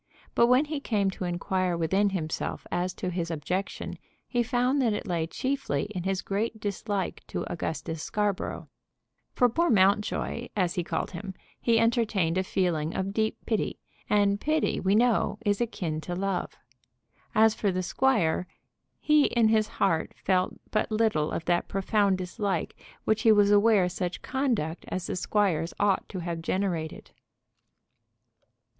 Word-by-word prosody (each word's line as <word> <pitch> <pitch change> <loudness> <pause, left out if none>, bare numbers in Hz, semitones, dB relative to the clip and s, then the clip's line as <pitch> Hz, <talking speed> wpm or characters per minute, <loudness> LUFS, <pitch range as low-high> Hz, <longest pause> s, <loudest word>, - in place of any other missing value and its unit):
But 235 - +5
when 255 +4 +4
he 300 -1 -3
came 205 -7 0
to 185 - -5
inquire 180 0 -1
within 190 +5 +2
himself 165 -5 -3
as 180 +1 0
to 180 - -3
his 170 -1 -2
objection 180 +5 -3 0.3
he 245 - +1
found 250 +3 +1
that 230 -4 +2
it 210 - -3
lay 170 -4 -1
chiefly 260 - -1
in 180 - -3
his 190 -1 -1
great 220 +3 -2
dislike 205 -1 -3
to - - -3
Augustus 160 -1 -4
Scarborough. 205 0 -2 0.7
For 245 - +5
poor 335 +9 +1
Mountjoy, 210 +3 +2
as 180 -4 +1
he 175 - -1
called - - -3
him, 190 +1 -7 0.2
he 230 -1 +3
entertained 220 -7 +2
a - - +1
feeling 170 -5 -1
of 190 +1 -2
deep 220 0 0
pity, 220 -3 -1 0.3
and 205 -1 +3
pity 310 +1 +1
we 190 +2 +2
know, 240 +1 +2
is 205 +1 +1
akin 170 -9 -2
to 175 +2 -4
love. 195 0 -2 0.8
And 220 0 +6
for 205 -3 0
the 185 0 -2
squire, 180 -6 +1 0.5
he 300 -1 +4
in 230 -2 +3
his 215 -1 +3
heart 175 -7 0
felt 185 -1 +1 0.2
but 215 - +1
little 215 -9 +2
of 165 - -4
that 175 0 +1
profound 195 0 +1
dislike 190 +2 -2 0.3
which 220 0 +1
he 225 - +6
was 205 -1 +5
aware 205 -2 +5
such 180 0 -4
conduct 235 - -1
as 185 - -3
the - - -3
squire's 180 -4 0
ought 205 -2 +1
to 185 - -5
have 170 -1 -4
generated. 170 -3 -2
195 Hz, 155 wpm, -28 LUFS, 180-220 Hz, 0.8 s, And